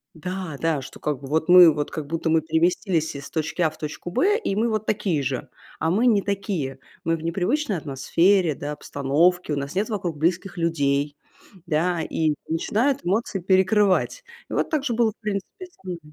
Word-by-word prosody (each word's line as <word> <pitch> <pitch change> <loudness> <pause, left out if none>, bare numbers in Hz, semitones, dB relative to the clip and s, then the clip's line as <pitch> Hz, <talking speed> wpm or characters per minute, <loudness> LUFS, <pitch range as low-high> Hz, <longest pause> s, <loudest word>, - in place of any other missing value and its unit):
Да 180 -2 -5
да, 160 -4 0
что, 130 - -11
как 150 -3 -2
бы, 135 - -8
вот, 160 +3 0
мы, 180 -2 +9
вот, 145 -1 -3
как 150 -3 -5
будто 165 +1 -2
мы 160 0 +3
переместились 160 0 0
из 140 0 -7
точки 160 +2 -2
А 160 - +4
в 155 - -16
точку 155 +3 -6
Б, 410 - +3
и 195 - -2
мы, 230 +2 +1
вот, 215 -1 -1
такие 190 -8 0
же. 130 -1 -3 0.3
А 160 - +1
мы 230 +6 +3
не 210 -4 +4
такие. 190 -10 -3 0.2
Мы 165 0 +1
в 160 - -10
непривычной 195 - 0
атмосфере, 160 +4 +2
да, 145 +1 -5
обстановке, 150 +4 +1
у - - 0
нас 140 +4 -4
нет 205 +4 0
вокруг 180 -8 -3
близких 175 +4 -1
людей. 145 -3 0 0.5
Да, 165 +2 +1
и 155 -1 0 0.2
начинают 235 - +1
эмоции 200 +1 0
перекрывать. 190 - +2 0.3
И - - -6
вот - - 0
так 305 -3 +1
же 240 - -1
было, 230 -2 +3
в 215 - -26
принципе, 210 - -4
со 360 - -30
мной. 175 -2 -4
170 Hz, 195 wpm, -24 LUFS, 155-200 Hz, 0.5 s, мы